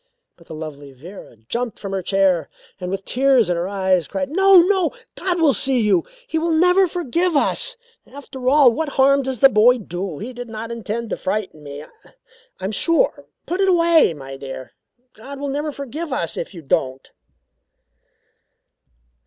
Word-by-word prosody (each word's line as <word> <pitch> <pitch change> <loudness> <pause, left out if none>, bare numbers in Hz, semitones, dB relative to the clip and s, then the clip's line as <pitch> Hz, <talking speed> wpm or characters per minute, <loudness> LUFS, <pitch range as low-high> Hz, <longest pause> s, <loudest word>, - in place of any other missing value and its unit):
But 170 - -21
the 160 - -8
lovely 145 -3 -8
Vera 160 +1 -12
jumped 240 - -3
from 195 - -7
her 195 -1 -2
chair 185 -4 +1 0.3
and, 180 -1 -5
with 195 +1 -4
tears 255 -6 +2
in - - +1
her 170 +2 -2
eyes, 190 -3 0
cried: 280 -1 -4
"No! 385 +2 +6
No! 375 -2 +1 0.2
God 360 -2 -2
will 310 -4 +4
see 260 +3 +1
you. 205 -6 +2 0.2
He 320 - -1
will 330 0 0
never 360 +3 +4
forgive 345 0 -1
us. - - +1 0.3
After 265 -2 -4
all, 280 -3 +6
what 310 +5 -3
harm 275 +1 +4
does 265 -3 -5
the 270 - +9
boy 245 +2 +5
do? 180 -5 -6
He 245 - -7
did 245 -1 -8
not 225 +1 -6
intend 230 0 -5
to - - -2
frighten 190 -5 -3
me, 145 0 -9
I - - -17 0.7
am 190 - -3
sure, 335 - +1 0.2
put 360 +3 -2
it 385 - +3
away, 335 - +4
my 135 -1 -9
dear 135 -1 -8 0.4
God 270 +6 -10
will 285 0 -3
never 295 +2 -2
forgive 285 +3 -6
us 170 -10 -2
if - - -5
you 165 - -10
don't." 135 -1 -2
235 Hz, 180 wpm, -20 LUFS, 185-300 Hz, 0.7 s, the